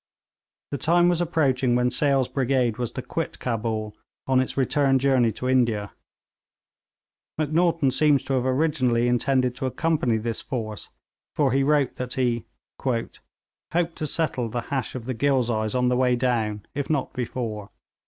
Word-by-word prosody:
The 140 Hz, -, -3 dB
time 175 Hz, +2 st, +4 dB
was 175 Hz, -1 st, +1 dB
approaching 135 Hz, -7 st, +1 dB
when 125 Hz, 0 st, +2 dB
Sale's 135 Hz, -1 st, +2 dB
brigade 130 Hz, -3 st, 0 dB
was 120 Hz, -2 st, -1 dB
to -, -, -5 dB
quit -, -, -4 dB
Cabul 110 Hz, -3 st, -3 dB, 0.3 s
on 130 Hz, -1 st, +3 dB
its 130 Hz, -, -2 dB
return 135 Hz, 0 st, +3 dB
journey 130 Hz, -3 st, +3 dB
to 125 Hz, -, -4 dB
India. 115 Hz, -6 st, +1 dB, 1.4 s
Macnaghten 160 Hz, -1 st, +2 dB
seems 145 Hz, 0 st, +3 dB
to 135 Hz, -, -3 dB
have 130 Hz, -2 st, +1 dB
originally 130 Hz, -4 st, +1 dB
intended 125 Hz, 0 st, +1 dB
to 130 Hz, -, -2 dB
accompany 140 Hz, -4 st, 0 dB
this 115 Hz, 0 st, -3 dB
force, 110 Hz, -5 st, -5 dB, 0.5 s
for 140 Hz, -3 st, +2 dB
he 135 Hz, +2 st, +2 dB
wrote 140 Hz, -1 st, +2 dB
that 125 Hz, -1 st, -4 dB
he 120 Hz, -3 st, 0 dB, 0.3 s
'hoped 120 Hz, -4 st, -2 dB, 0.8 s
to 155 Hz, -, -2 dB
settle 135 Hz, -6 st, -1 dB
the 120 Hz, +2 st, -3 dB
hash 135 Hz, -2 st, -2 dB
of 120 Hz, -3 st, -6 dB
the 130 Hz, -, -2 dB
Ghilzais 120 Hz, -3 st, 0 dB
on 125 Hz, 0 st, +2 dB
the 125 Hz, -, +2 dB
way 125 Hz, 0 st, +3 dB
down, 115 Hz, -4 st, -1 dB
if 140 Hz, -1 st, -3 dB
not 145 Hz, -4 st, -1 dB
before.' 115 Hz, -4 st, -4 dB
130 Hz, 155 wpm, -24 LUFS, 120-140 Hz, 1.4 s, time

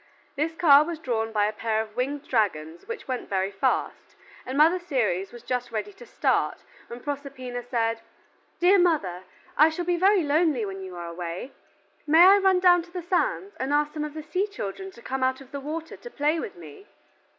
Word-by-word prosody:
This 310 Hz, +3 st, -1 dB
car 295 Hz, -4 st, +7 dB
was 335 Hz, +1 st, -5 dB
drawn 225 Hz, -7 st, -2 dB
by 210 Hz, -2 st, +2 dB
a 210 Hz, -, -1 dB
pair 220 Hz, 0 st, -1 dB
of 220 Hz, -1 st, -5 dB
winged 280 Hz, +3 st, -3 dB
dragons 170 Hz, -8 st, -1 dB
which 465 Hz, 0 st, -7 dB
went 255 Hz, -2 st, -4 dB
very 190 Hz, 0 st, 0 dB
fast, 195 Hz, -, -2 dB, 0.3 s
and 260 Hz, +2 st, -3 dB
Mother 325 Hz, +5 st, +5 dB
Ceres 215 Hz, -, -1 dB
was 240 Hz, -1 st, -12 dB
just 250 Hz, -1 st, -3 dB
ready 230 Hz, -, -4 dB
to 470 Hz, +5 st, -14 dB
start, -, -, 0 dB, 0.2 s
when 240 Hz, +1 st, -9 dB
Proserpina 270 Hz, -3 st, -5 dB
said, 230 Hz, -2 st, -1 dB, 0.6 s
"Dear 375 Hz, +3 st, +5 dB
mother, 195 Hz, -, +1 dB, 0.3 s
I 305 Hz, +2 st, +6 dB
shall 345 Hz, +2 st, -4 dB
be 350 Hz, 0 st, +1 dB
very 385 Hz, +1 st, +4 dB
lonely 295 Hz, -5 st, +2 dB
while 195 Hz, -1 st, -6 dB
you 185 Hz, -1 st, -8 dB
are 175 Hz, 0 st, -6 dB
away, 170 Hz, +7 st, -6 dB, 0.6 s
may 325 Hz, +4 st, +7 dB
I 395 Hz, +2 st, +8 dB
run 385 Hz, -2 st, +3 dB
down 355 Hz, -1 st, +5 dB
to 345 Hz, +1 st, -15 dB
the 360 Hz, -1 st, -5 dB
sands, 390 Hz, +3 st, -1 dB
and 265 Hz, +2 st, -2 dB
ask 295 Hz, 0 st, +1 dB
some 305 Hz, -1 st, -3 dB
of 300 Hz, 0 st, -6 dB
the 310 Hz, -, -6 dB
sea 365 Hz, +7 st, -1 dB
children 385 Hz, -, -6 dB
to 235 Hz, -, -16 dB
come 265 Hz, 0 st, -3 dB
out 260 Hz, 0 st, +1 dB
of 270 Hz, -1 st, -15 dB
the 280 Hz, -, -5 dB
water 315 Hz, +3 st, -6 dB
to 485 Hz, -, -11 dB
play 300 Hz, -4 st, 0 dB
with 205 Hz, -, -6 dB
me?" 155 Hz, -4 st, -13 dB
280 Hz, 205 wpm, -26 LUFS, 225-340 Hz, 0.6 s, I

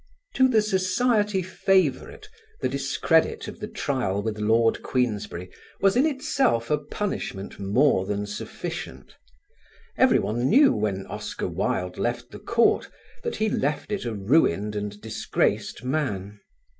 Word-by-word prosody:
To 260 Hz, -, +5 dB
the 225 Hz, -4 st, +3 dB
society 210 Hz, 0 st, +1 dB
favourite 185 Hz, -, 0 dB, 0.3 s
the -, -, 0 dB
discredit 140 Hz, +4 st, +1 dB
of -, -, -8 dB
the -, -, -5 dB
trial 105 Hz, -8 st, -1 dB
with 110 Hz, -1 st, -3 dB
Lord 115 Hz, +2 st, +2 dB
Queensberry 105 Hz, -8 st, -2 dB, 0.3 s
was 195 Hz, +1 st, +3 dB
in 265 Hz, +6 st, +4 dB
itself 270 Hz, -, 0 dB
a 150 Hz, -, +3 dB
punishment 150 Hz, -, -4 dB
more 100 Hz, 0 st, +2 dB
than 105 Hz, 0 st, -2 dB
sufficient. 85 Hz, -9 st, -7 dB, 0.9 s
Everyone 120 Hz, +4 st, +3 dB
knew 275 Hz, +6 st, +6 dB
when 100 Hz, -2 st, -2 dB
Oscar -, -, -5 dB
Wilde 90 Hz, 0 st, -2 dB
left 120 Hz, 0 st, -2 dB
the -, -, -9 dB
court 235 Hz, 0 st, +2 dB, 0.3 s
that 470 Hz, -, -3 dB
he 220 Hz, -, 0 dB
left 150 Hz, -1 st, -1 dB
it 205 Hz, -, -2 dB
a 115 Hz, -2 st, -3 dB
ruined 105 Hz, -, +2 dB
and 105 Hz, 0 st, -4 dB
disgraced 110 Hz, +1 st, -1 dB
man. 105 Hz, -8 st, -2 dB
130 Hz, 130 wpm, -25 LUFS, -, 0.9 s, knew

